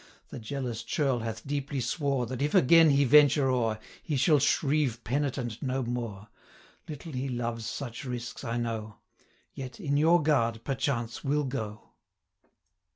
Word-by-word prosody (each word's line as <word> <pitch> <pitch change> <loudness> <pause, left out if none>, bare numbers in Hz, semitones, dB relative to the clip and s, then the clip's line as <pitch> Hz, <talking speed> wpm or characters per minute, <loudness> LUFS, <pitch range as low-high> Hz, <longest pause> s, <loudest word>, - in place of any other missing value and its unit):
The - - -7
jealous 120 -1 -4
churl 135 -1 0
hath 115 -1 -5
deeply 140 0 -3
swore, 135 +1 -1
360 130 +3 -5
That, 125 - -2
if 150 - 0
again 165 +4 +7
he 140 0 +4
venture 145 0 +5
o'er, 115 -4 0 0.2
He 150 - -2
shall 145 +3 +4
shrieve 135 -4 +1
penitent 125 -3 -2
no 130 -1 -1
more. 115 -4 -4 0.6
Little 155 +2 -7
he 135 0 -3
loves 120 -2 -3
such 120 -5 -5
risks, 125 -1 -6
I 115 -1 -2
know; 110 -2 -3 0.6
Yet, 130 +4 -8
in 145 -7 0
your 165 +2 +4
guard, 115 -7 +1
perchance 125 -4 -2
will 150 +1 +1
go.' 110 -6 -5
130 Hz, 155 wpm, -28 LUFS, 115-145 Hz, 0.6 s, again